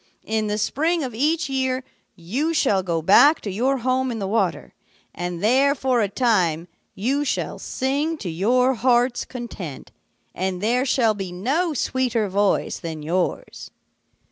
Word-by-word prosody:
In 220 -1 -1
the 210 0 -1
spring 320 +9 0
of 255 -3 -4
each 305 +8 +1
year 260 -1 -1 0.3
you 250 - -2
shall 205 -11 +2
go 170 -3 -2
back 285 - +6
to 205 - -4
your 255 +8 +1
home 255 +1 0
in 230 - -4
the 200 - -3
water, 220 +4 -1 0.4
and 175 0 -5
there 270 +6 +4
for 255 -3 +1
a 205 - 0
time 185 -8 +1 0.3
you 265 +9 0
shall 285 - -2
sing 285 +5 -1
to 205 - -7
your 250 +10 +2
heart's 245 +1 +1
content, 210 - -8 0.4
and 185 0 -2
there 240 +6 +1
shall 235 -4 +3
be 195 -3 -6
no 290 - -1
sweeter 240 -5 0
voice 200 +1 0
than 160 -3 -6
yours.' 175 +4 -3
235 Hz, 155 wpm, -22 LUFS, 190-265 Hz, 0.4 s, back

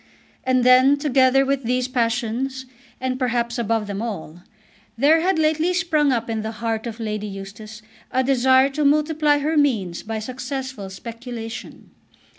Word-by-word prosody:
And 255 -1 +2
then, 255 +3 +6
together 270 -2 +3
with 275 0 0
these 250 +1 0
passions, 245 +2 -1 0.3
and 255 0 -2
perhaps 240 -2 -1
above 225 -1 0
them 200 0 -4
all, 180 -7 -6 0.6
there 305 +6 +4
had 370 0 +1
lately 315 +3 +1
sprung 310 -6 +2
up 235 -2 -1
in 225 -1 -2
the 220 +1 -5
heart 225 0 -3
of 230 0 -7
Lady 215 -1 -3
Eustace 205 +2 -9 0.3
a 260 - +1
desire 260 0 +4
to 300 +2 -1
multiply 300 0 +3
her 300 +3 -1
means 220 - +1
by 225 0 -5
successful 255 -2 -5
speculation. 230 +3 -8
250 Hz, 150 wpm, -22 LUFS, 225-275 Hz, 0.6 s, then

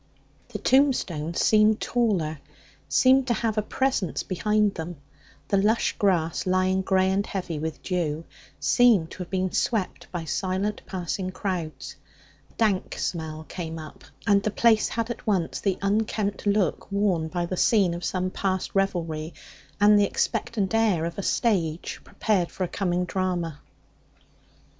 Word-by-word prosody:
The - - -6
tombstones 185 - +1
seemed 215 0 +4
taller, 185 -11 0 0.5
seemed 260 0 +4
to 240 - +2
have 220 -1 -1
a - - +2
presence 230 - -1
behind 210 +2 +1
them; 165 0 -6 0.5
the 200 - +3
lush 215 +4 +2
grass, 175 -4 +1
lying 185 +1 +2
grey 190 0 +2
and 195 +1 +1
heavy 180 -6 -4
with 160 0 -5
dew, 165 -4 -2 0.3
seemed 225 -10 +4
to - - -9
have 180 - -5
been 185 -1 -1
swept 215 -6 -1
by 175 -2 -4
silent 190 +5 -2
passing 185 0 -3
crowds. 180 -5 -4 0.5
A - - -25
dank 210 -5 0
smell 160 -2 -3
came 165 0 -6
up, 155 -2 -10 0.2
and 200 0 +4
the 215 - 0
place 220 +1 +3
had 230 +1 -2
at 240 - -8
once 185 -6 0
the 195 -2 0
unkempt 205 0 0
look 200 -2 0
worn 195 -5 +1
by 175 +1 -2
the 185 - -3
scene 195 -2 +3
of 175 +1 -6
some 185 +1 -1
past 190 -1 -2
revelry 170 -5 -1 0.4
and 205 0 +6
the 205 - +4
expectant 220 0 -1
air 215 -8 +2
of 170 +3 -5
a - - 0
stage 180 -7 0
prepared 195 -6 0
for 190 - -4
a - - 0
coming 180 -1 -1
drama. 175 -5 -2
190 Hz, 150 wpm, -25 LUFS, 170-210 Hz, 0.5 s, and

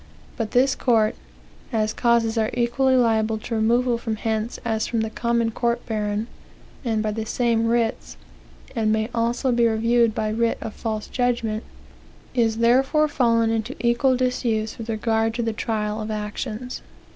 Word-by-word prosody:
But 225 -4 -3
this 260 +3 +3
court, 225 -4 +2 0.6
as 215 -2 0
causes 235 -2 +2
are 220 -1 +1
equally 260 +2 +2
liable 220 -3 +2
to 225 +2 -6
removal 235 +2 +2
from 225 -2 -2
hence 220 +1 -2
as 220 -1 0
from 230 -2 0
the 220 0 -2
common 235 -1 0
court 235 +1 -1
baron, 210 -1 -2 0.6
and 220 -3 0
by 215 - 0
the 220 +1 -3
same 230 0 +1
writs, 230 -1 -1 0.6
and 220 -2 +1
may 220 +2 0
also 235 +3 0
be 235 -1 +3
reviewed 230 0 +2
by 215 - -1
writ 230 +1 +1
of 220 - -6
false 215 -2 -3
judgment, 235 -3 -1 0.7
is 225 -3 +1
therefore 265 +6 +3
fallen 230 -5 +2
into 225 +3 -2
equal 240 +2 +2
disuse 235 -4 -1
with 225 0 -6
regard 225 0 0
to 240 - -1
the 225 -1 -1
trial 215 -1 -2
of 215 - -5
actions." 215 +3 -4
230 Hz, 160 wpm, -23 LUFS, 220-240 Hz, 0.7 s, this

